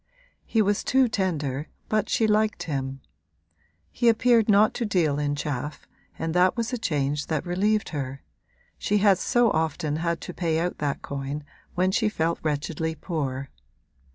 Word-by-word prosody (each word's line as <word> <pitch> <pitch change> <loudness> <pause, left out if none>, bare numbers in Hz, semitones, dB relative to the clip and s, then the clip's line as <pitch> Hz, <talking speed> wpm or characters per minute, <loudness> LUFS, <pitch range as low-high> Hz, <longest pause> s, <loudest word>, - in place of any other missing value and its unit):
He 220 -2 +3
was 205 0 +1
too 265 -1 +3
tender, 155 - -1 0.2
but 215 -1 0
she 225 - +2
liked 215 0 +2
him; 135 -3 -3 0.9
he 240 - +3
appeared 230 -1 +4
not 210 +1 +5
to 245 - -2
deal 165 -9 +1
in 145 -1 0
chaff 145 0 -4 0.3
and 165 0 -2
that 180 +4 +3
was 230 +2 -2
a 250 - -1
change 145 -7 -1
that 155 -3 -1
relieved 205 +4 +1
her 135 -3 -5 0.6
she 210 - +1
had 200 -2 +4
so 240 -3 +3
often 155 -1 -1
had 170 0 -1
to 180 - -7
pay 165 -3 0
out 175 +2 -2
that 145 -2 -2
coin 140 +1 -4 0.3
when 185 +1 +2
she 215 +2 +2
felt 165 -4 -1
wretchedly 160 +1 -2
poor. 140 -5 -3
170 Hz, 160 wpm, -26 LUFS, 145-210 Hz, 0.9 s, not